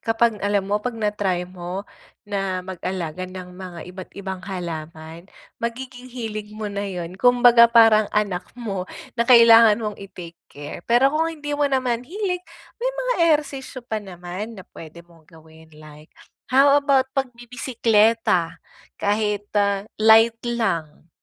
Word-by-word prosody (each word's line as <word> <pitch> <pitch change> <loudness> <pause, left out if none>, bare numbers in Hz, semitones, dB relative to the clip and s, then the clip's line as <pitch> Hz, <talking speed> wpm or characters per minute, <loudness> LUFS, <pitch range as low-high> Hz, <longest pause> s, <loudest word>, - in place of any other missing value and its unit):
Kapag 225 0 +2
alam 205 -1 0
mo 205 - +2
'pag 240 +4 -3
na-try 205 -5 -2
mo, 180 +2 -7 0.4
na 195 -2 -2
mag-alaga 185 -2 -5
ng 185 -1 -10
mga 180 -3 -8
iba't 185 0 -10
ibang 190 -1 -6
halaman, 165 -3 -7 0.3
magiging 250 +1 -6
hilig 215 -4 -6
mo 215 0 -5
na 200 0 -4
yun, 180 -2 -6
kumbaga 245 +1 +6
parang 225 -2 +6
anak 200 -4 0
mo 200 -6 -4 0.3
na 235 - +2
kailangan 230 -2 +7
mong 210 -2 -4
i-take 175 -4 -11 0.2
care. 145 +4 -9
Pero 240 +3 +4
kung 320 +3 0
hindi 295 -2 -5
mo 290 - +1
naman 255 -3 0
hilig, 365 +3 -3 0.3
may - - -1
mga - - -1 0.2
ehersisyo 275 -3 -3
pa 220 - -2
naman 190 +3 -8
na - - -10
p'wede 165 +1 -12
mong 165 -2 -22
gawin 160 0 -18
like, 150 0 -15 0.4
how 280 +2 +6
about 275 -2 +2
pagbibisekleta? 230 -7 +1 0.4
Kahit 205 0 -1
ah, 200 0 +1
light 225 +1 +5
lang. 170 -10 -2
210 Hz, 140 wpm, -22 LUFS, 180-240 Hz, 0.4 s, kailangan